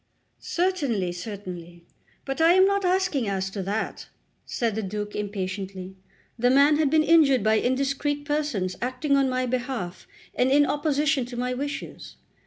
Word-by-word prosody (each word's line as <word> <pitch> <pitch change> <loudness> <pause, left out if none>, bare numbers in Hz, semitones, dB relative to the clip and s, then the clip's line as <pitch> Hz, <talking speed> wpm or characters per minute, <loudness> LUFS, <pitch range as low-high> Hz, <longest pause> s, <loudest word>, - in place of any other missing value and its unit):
"Certainly, 285 - -1
certainly; 175 -3 -8 0.4
but 270 +3 -3
I 330 +2 +6
am 375 +1 +6
not 400 0 +1
asking 360 - +1
as 190 -1 -2
to 195 - -4
that," 200 +4 -3 0.4
said 230 -3 -1
the 220 - -2
Duke 210 +1 -5
impatiently. 190 -2 -5 0.4
"The 245 +2 +3
man 280 +3 +5
had 305 -2 +2
been 310 +2 +3
injured 300 -8 +4
by 220 0 +3
indiscreet 275 +3 -1
persons 290 -12 -1
acting 255 +4 0
on 275 -1 +3
my 255 0 0
behalf 245 -7 -4 0.3
and 250 - +2
in 290 +2 +5
opposition 295 -2 0
to 245 -1 -8
my 250 +1 -1
wishes." 285 +3 -6
255 Hz, 155 wpm, -25 LUFS, 205-290 Hz, 0.4 s, I